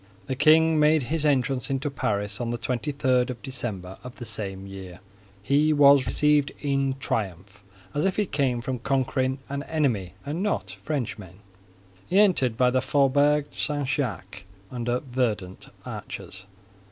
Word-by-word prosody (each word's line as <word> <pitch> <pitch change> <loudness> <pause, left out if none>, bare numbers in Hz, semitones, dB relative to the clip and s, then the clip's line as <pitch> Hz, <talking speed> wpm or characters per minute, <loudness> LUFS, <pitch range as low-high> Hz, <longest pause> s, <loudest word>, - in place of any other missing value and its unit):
The 130 - -3
king 155 +2 +5
made 150 -1 +4
his 155 -2 +1
entrance 135 -3 +1
into 135 +1 -1
Paris 105 -4 -2
on 120 - -2
the 120 - -2
twenty 125 +4 -2
third 130 -3 +1
of 125 -2 -5
December 105 -9 -5
of 125 0 -9
the 120 - -8
same 100 -3 -4
year. 95 -2 -9 0.4
He 145 +6 +3
was 140 -2 +6
received 150 -1 +3
in 135 -2 0
triumph, 100 -4 -4 0.3
as 145 - 0
if 190 -1 +1
he 210 - +1
came 135 -7 0
from 125 0 -3
conquering 130 0 0
an 140 0 -3
enemy 130 - -1
and 150 +5 -3
not 195 - -1
Frenchmen. 105 - -5 0.7
He 185 - +1
entered 170 - +4
by 125 0 +4
the 130 0 +2
Faubourg 145 +2 +3
St. 145 -2 -2
Jacques, 135 -10 -3 0.3
under 120 0 -1
verdant 115 -8 -3 0.2
arches. 95 +1 -8
130 Hz, 155 wpm, -25 LUFS, 110-145 Hz, 0.7 s, was